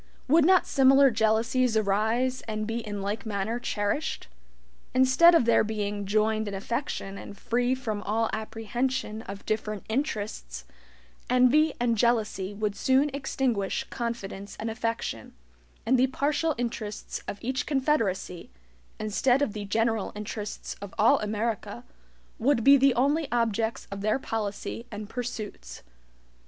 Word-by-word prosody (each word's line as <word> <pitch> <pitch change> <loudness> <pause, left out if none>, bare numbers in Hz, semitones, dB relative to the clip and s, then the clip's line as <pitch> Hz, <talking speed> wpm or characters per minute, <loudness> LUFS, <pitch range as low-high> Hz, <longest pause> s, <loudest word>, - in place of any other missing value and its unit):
Would 310 +3 +5
not 370 +1 +5
similar 270 0 +5
jealousies 225 +2 +2
arise, 220 +5 +1
and 215 -1 -2
be 225 +2 -2
in 205 -3 -5
like 205 +3 -3
manner 220 +2 -2
cherished? 205 - -2 0.7
Instead 260 +7 +6
of 285 - +4
their 235 - +4
being 205 -2 -3
"joined 215 +1 +1
in 200 - -4
affection" 200 -2 -4
and 200 - -10
free 245 +4 0
from 220 -5 -4
all 225 +2 0
apprehension 225 +1 -3
of 200 -1 -9
different 215 -2 -2
"interests," 210 - -3 0.6
envy 255 +5 +4
and 240 -1 +2
jealousy 215 -5 +1
would 205 0 -2
soon 270 +5 +2
extinguish 260 -7 -1
confidence 220 -5 -5
and 225 +1 -3
affection, 230 - -4 0.5
and 255 +1 +3
the 260 - +4
partial 290 +3 0
interests 225 -3 -4
of - - -4
each 260 +3 -2
confederacy, 255 - 0 0.5
instead 245 +6 +2
of 215 - -1
the 210 -1 -5
general 225 0 0
interests 210 0 -5
of 200 -1 -8
all 220 - +5
America, 210 - -3 0.6
would 240 -1 +2
be 280 +3 +8
the 270 -2 +4
only 285 +5 +2
objects 230 -1 0
of 200 0 -5
their 215 +3 +1
policy 225 -1 -4
and 210 0 -7
pursuits. 215 - -6
225 Hz, 135 wpm, -27 LUFS, 210-255 Hz, 0.7 s, be